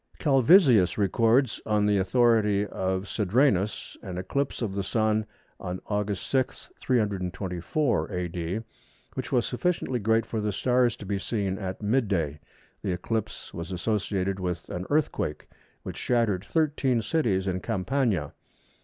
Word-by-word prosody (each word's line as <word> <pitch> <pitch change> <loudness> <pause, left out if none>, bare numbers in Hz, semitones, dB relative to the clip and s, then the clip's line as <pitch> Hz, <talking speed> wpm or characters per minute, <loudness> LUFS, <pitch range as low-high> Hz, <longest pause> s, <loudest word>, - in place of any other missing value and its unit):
Calvisius 135 - +5
records, 115 +5 +2
on 105 -1 +1
the 105 -1 +3
authority 105 -1 +3
of 95 -1 -2
Cedrenus, 105 0 +1
an 95 -4 -6
eclipse 125 +8 -2
of 105 -4 -2
the 100 - -1
Sun 110 +2 +1 0.3
on 90 0 -4
August 105 -1 -2
6, 130 -1 -1
324 100 - -1
A.D., 90 +2 -3 0.5
which - - -5
was 120 -2 +2
sufficiently 130 -2 -1
great 110 +1 +2
for 110 -1 -3
the 105 0 0
stars 125 +3 +2
to 105 - -10
be 100 0 -1
seen 95 -3 -2
at 95 +1 -5
mid 115 +3 +2
day. 80 -7 -1 0.4
The 95 - -1
eclipse 105 +4 -4
was 85 +3 -6
associated 95 0 -1
with 90 -2 -3
an 90 +1 -4
earthquake, 145 - -1 0.4
which - - -6
shattered 110 -6 +1
thirteen 140 -7 +1
cities 105 -8 +1
in 95 -1 -1
Campania. 110 +3 -1
105 Hz, 135 wpm, -27 LUFS, 95-120 Hz, 0.5 s, Calvisius